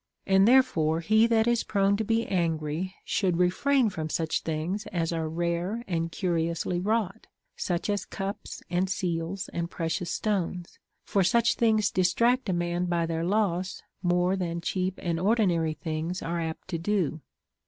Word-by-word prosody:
And 190 +1 +5
therefore 175 -12 +4
he 220 +5 +4
that 225 -1 +3
is 240 -1 +2
prone 200 -1 +2
to 220 - -1
be 225 +2 +1
angry 165 0 -1
should 185 -4 +1
refrain 225 +7 +2
from 155 -3 -4
such 160 0 -1
things 165 +6 -3
as 170 -3 -1
are 160 -1 -2
rare 170 +7 -2
and 165 -2 -1
curiously 170 -1 -1
Avrought, 210 +1 -1 0.3
such 175 -2 -2
ay 205 -1 +1
cups 195 +1 -5
and 180 +2 0
seals 180 -1 -2
and 170 0 -2
precious 170 +1 -2
stones; 185 -4 -2 0.2
for 195 - +1
such 235 +4 +3
things 215 -3 +2
dis 185 -1 +2
tract 245 -1 +2
a - - +3
man 175 +1 -1
by 170 -1 +1
their 165 0 -2
loss 185 -1 0 0.2
more 180 +1 +2
than 170 -3 -2
cheap 185 +2 -1
and 170 -2 -1
ordinary 180 -6 +2
things 160 +4 -3
are 170 +1 -2
apt 160 -1 -5
to 170 -3 -2
do. 170 -4 0
180 Hz, 165 wpm, -27 LUFS, 170-205 Hz, 0.3 s, And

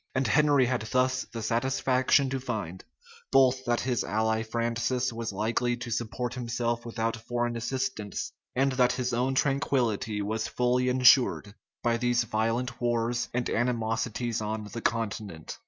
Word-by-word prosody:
And 130 0 +1
Henry 145 +2 +4
had 125 -1 0
thus 130 +1 +1
the 115 -2 -5
satisfaction 130 +3 +2
to 135 - -1
find, 105 -9 -5 0.5
both 130 -1 +4
that 120 0 +1
his 125 -2 0
ally 110 +1 0
Francis 120 +2 -1
was 115 -1 -4
likely 115 +4 0
to 120 -1 -6
support 120 +2 -2
himself 120 -1 -2
without 115 0 -1
foreign 120 +1 -2
assistance, 120 -3 -3 0.2
and 135 +2 +2
that 125 -1 +3
his 125 0 -2
own 125 +3 0
tranquillity 125 -7 0
was 110 +2 -2
fully 125 +1 +1
insured 125 -4 +4 0.3
by 115 -1 +2
these 120 0 +1
violent 115 +3 -1
wars 120 0 0
and 120 0 -1
animosities 115 0 -1
on 110 0 -3
the 115 - -4
continent. 105 -8 -3
120 Hz, 145 wpm, -28 LUFS, 115-125 Hz, 0.5 s, Henry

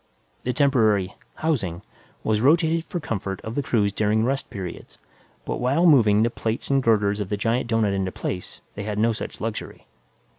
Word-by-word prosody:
The 125 - -1
temporary 110 -9 +2 0.3
"housing" 100 - -1 0.4
was 110 -1 +1
rotated 165 +4 +3
for 175 - -4
comfort 100 - -4
of 110 - -6
the 145 - 0
crews 105 -7 +1
during 110 +2 +1
rest 135 +2 -1
periods, 95 -3 -7 0.5
but - - -3
while 135 +8 +2
moving 110 -10 +5
the 115 - +1
plates 115 +3 -3
and 135 0 +3
girders 105 -3 +2
of 100 -2 -3
the 105 - -1
giant 115 +4 0
doughnut 115 -3 +1
into 95 -1 -1
place, 90 0 -5
they 100 - -6
had 105 0 -3
no 115 +2 +3
such - - -6
luxuries. 110 -1 -5
110 Hz, 180 wpm, -24 LUFS, 100-130 Hz, 0.5 s, moving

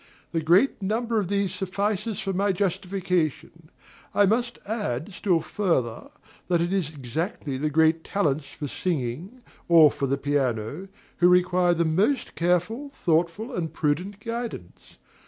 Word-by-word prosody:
The 165 - 0
great 185 - +3
number 225 +3 0
of 200 - -2
these 200 -1 0
suffices 200 +3 -2
for 195 -2 -2
my 200 +2 +1
justification. 180 -4 -2 0.5
I 205 - +6
must 235 +4 0
add, 205 - -3
still 180 -3 +1
further, 145 - -1 0.4
that 175 -2 +2
it 175 +2 0
is 185 -7 0
exactly 150 - -4
the 150 +4 -1
"great 160 +2 +3
talents" 150 -8 0
for 145 +1 -6
singing, 160 - -3 0.3
or 160 -4 +8
for 140 - -2
the 135 +1 0
piano, 135 - -1 0.3
who 175 - +5
require 180 -1 +3
the 170 0 +1
most 200 - +1
careful, 180 - 0
thoughtful, 180 - 0
and 165 -3 -2
prudent 180 +7 -1
guidance. 230 - -6
180 Hz, 140 wpm, -25 LUFS, 155-200 Hz, 0.5 s, or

